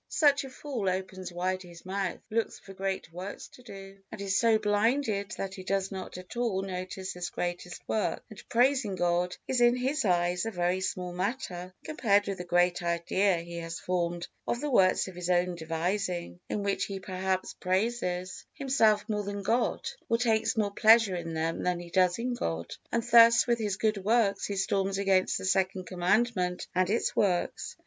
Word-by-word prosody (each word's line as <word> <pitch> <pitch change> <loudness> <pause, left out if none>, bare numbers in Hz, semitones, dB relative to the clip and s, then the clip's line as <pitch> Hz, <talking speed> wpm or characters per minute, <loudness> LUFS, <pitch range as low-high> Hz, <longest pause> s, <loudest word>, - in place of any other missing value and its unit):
Such 285 -3 +3
a 270 - -7
fool 260 -7 -3
opens 185 0 -4
wide 185 +2 -1
his 175 -1 -13
mouth, 190 -1 -2
looks 225 +1 -1
for 195 - -12
great 190 -3 -3
works 185 +3 -7
to - - -16
do, 195 -4 -11
and 220 - -8
is 195 -1 -1
so 230 0 +4
blinded 210 0 +1
that 195 -1 -4
he 190 - -8
does 195 0 -1
not 190 -2 -6
at 185 +5 -10
all 225 -6 0
notice 185 0 -5
this 180 -1 -4
greatest 175 0 -5
work, 215 - -1
and 215 -4 -13
praising 245 -4 +2
God 175 0 0
is 255 -2 +1
in 240 0 +6
his 265 +5 0
eyes 175 -2 +1
a - - 0
very 180 -2 0
small 180 -1 -3
matter 185 -2 -3
compared 210 -10 +2
with 195 -2 -3
the - - -3
great 175 0 +2
idea 175 +2 +1
he 170 0 -7
has 165 0 -5
formed 175 -1 -2 0.2
of 240 - 0
the 295 +1 -2
works 185 -6 +4
of 190 - -8
his 180 0 -5
own 180 0 +2
devising, 175 +2 -2
in 205 - -2
which 200 -1 0
he 195 -1 -5
perhaps 185 0 -2
praises 185 -2 -1
himself 225 -7 +2
more 210 -2 -1
than 200 0 -5
God, 235 +4 0 0.2
or 230 - +3
takes 225 -1 +1
more 205 -2 +1
pleasure 220 -2 +5
in 165 -2 -4
them 165 +1 -1
than 180 -1 0
he 175 -1 -10
does 180 -1 +3
in 245 +2 -2
God; 85 - -3 0.2
and 235 - +1
thus 235 0 +7
with 235 -1 +1
his 205 -3 -1
good 215 -3 0
works 215 -1 +2
he 200 - -3
storms 195 0 0
against 195 -2 +2
the - - -5
Second 190 0 +1
Commandment 185 0 0
and 185 0 +2
its 225 +3 0
works. 180 -4 0
190 Hz, 190 wpm, -29 LUFS, 180-220 Hz, 0.2 s, thus